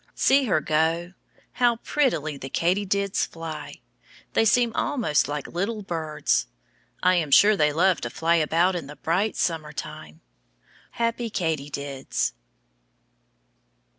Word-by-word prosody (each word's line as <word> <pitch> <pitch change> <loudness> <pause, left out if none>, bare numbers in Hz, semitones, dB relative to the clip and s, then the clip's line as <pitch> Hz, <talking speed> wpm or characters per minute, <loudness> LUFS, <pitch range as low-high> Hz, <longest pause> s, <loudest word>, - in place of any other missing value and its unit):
See 275 0 +4
her 185 -9 +2
go! 165 +4 0 0.4
How 240 -1 +2
prettily 230 - 0
the 135 -1 -8
katydids 195 +4 0
fly. 165 -1 -8 0.5
They 225 - +3
seem 235 +1 +3
almost 230 - +1
like 145 -1 -4
little 205 +5 -3
birds. 160 - -1 0.6
I 185 - +5
am 160 -4 0
sure 205 +9 +6
they 150 -5 +3
love 180 +4 +2
to 120 - -3
fly 165 +5 +1
about 170 +4 +2
in 165 -6 -4
the 145 - -10
bright 185 +9 0
summer 160 -3 -1
time. 80 - -8 0.7
Happy 230 0 -1
katydids. 145 -7 -2
170 Hz, 125 wpm, -25 LUFS, 150-205 Hz, 0.7 s, sure